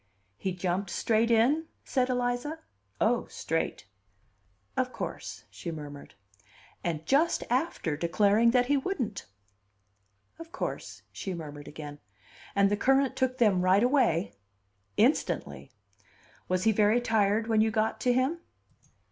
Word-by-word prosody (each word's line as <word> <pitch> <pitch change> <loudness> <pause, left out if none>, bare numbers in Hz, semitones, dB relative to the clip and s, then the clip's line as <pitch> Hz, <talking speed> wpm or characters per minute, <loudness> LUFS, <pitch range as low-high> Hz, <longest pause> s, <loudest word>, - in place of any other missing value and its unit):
"He 190 - -3
jumped 180 +1 -2
straight 225 +4 +1
in?" 260 +8 +3 0.2
said 255 -2 0
Eliza. 245 +4 -1 0.4
"Oh, 235 +2 +2
straight!" 165 -8 -3 0.9
"Of 255 0 0
course," - - -6
she 170 - -7
murmured. 145 -6 -8 0.7
"And 160 -2 -2
just 295 - +2
after 250 - 0
declaring 205 +8 +3
that 245 +1 +3
he 285 +3 +2
wouldn't." 265 - -3 1.1
"Of 330 0 -10
course," - - -5
she 190 -2 -5
murmured 145 -3 -8
again. 145 -1 -8 0.6
"And 200 0 +4
the 205 - +2
current 270 +3 +3
took 260 -1 0
them 210 -7 +3
right 185 +4 +4
away?" 240 - +2 0.6
"Instantly." 70 -1 +1 0.8
"Was 185 0 0
he 225 - +5
very 215 +2 +3
tired 220 -2 +2
when 220 -1 +3
you 220 - +3
got 220 0 0
to 250 - +3
him?" 260 +7 +1
220 Hz, 130 wpm, -29 LUFS, 180-250 Hz, 1.1 s, he